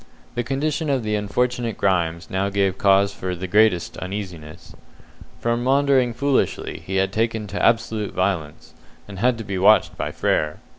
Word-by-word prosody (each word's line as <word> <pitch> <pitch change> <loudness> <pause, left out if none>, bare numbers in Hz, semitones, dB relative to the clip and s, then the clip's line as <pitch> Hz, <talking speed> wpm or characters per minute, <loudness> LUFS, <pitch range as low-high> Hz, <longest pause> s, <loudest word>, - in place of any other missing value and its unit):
The 120 - -1
condition 145 +4 -2
of 135 -4 0
the 105 0 -2
unfortunate 120 +3 -1
Grimes 85 -3 0
now 95 +1 0
gave 100 -1 0
cause 100 0 +4
for 90 -1 -4
the 90 +2 -5
greatest 100 -2 +2
uneasiness. 85 -4 -7 0.7
From 120 +1 -1
maundering 135 -1 +3
foolishly 140 0 -1
he 95 - -5
had 95 0 +1
taken 110 0 -1
to 100 0 -4
absolute 115 -2 +1
violence, 90 -6 -2 0.3
and 100 -2 -9
had 125 +2 +2
to 115 - -6
be 100 -2 -4
watched 105 +3 +4
by - - -3
Frere. 75 0 0
100 Hz, 160 wpm, -22 LUFS, 95-120 Hz, 0.7 s, cause